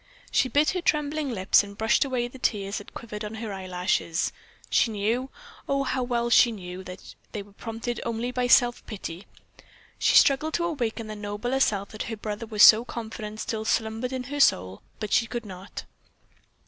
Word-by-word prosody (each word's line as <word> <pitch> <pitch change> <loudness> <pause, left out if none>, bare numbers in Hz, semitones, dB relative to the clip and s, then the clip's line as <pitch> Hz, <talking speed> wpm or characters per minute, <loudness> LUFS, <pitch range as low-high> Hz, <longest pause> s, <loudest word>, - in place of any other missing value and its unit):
She 255 - +2
bit 290 +5 +3
her 365 - -2
trembling 300 -2 0
lips 195 -3 +3
and 200 0 -11
brushed 220 +5 +3
away 255 -3 -1
the 255 +2 -13
tears 200 -4 -1
that 205 - -14
quivered 215 -2 -7
on 210 +1 -5
her 220 -2 -5
eyelashes. 180 -2 -1 0.4
She - - +4
knew, 225 +5 -1 0.4
oh, 275 0 +1
how 260 -1 -1
well 240 -1 -1
she 240 0 +6
knew, 185 -3 -7
that 180 - -10 0.2
they 210 -3 -4
were 200 - -19
prompted 225 +3 -5
only 235 +1 -2
by 250 0 0
self 245 0 +4
pity. 190 -4 -7 0.7
She - - +3
struggled 295 +3 +5
to 340 - 0
awaken 240 -8 -2
the 215 0 -6
nobler 210 +5 -2
self 200 -6 +1
that 215 - -8
her 225 - -4
brother 210 +1 -5
was 215 -2 +4
so 220 +1 +9
confident 220 -3 -6
still 220 -3 -3
slumbered 225 +3 -1
in 260 -1 -3
her 290 +3 -5
soul, 95 - +3 0.2
but 215 - -3
she 230 - +3
could 235 0 -5
not. 190 0 -8
225 Hz, 185 wpm, -26 LUFS, 205-250 Hz, 0.7 s, so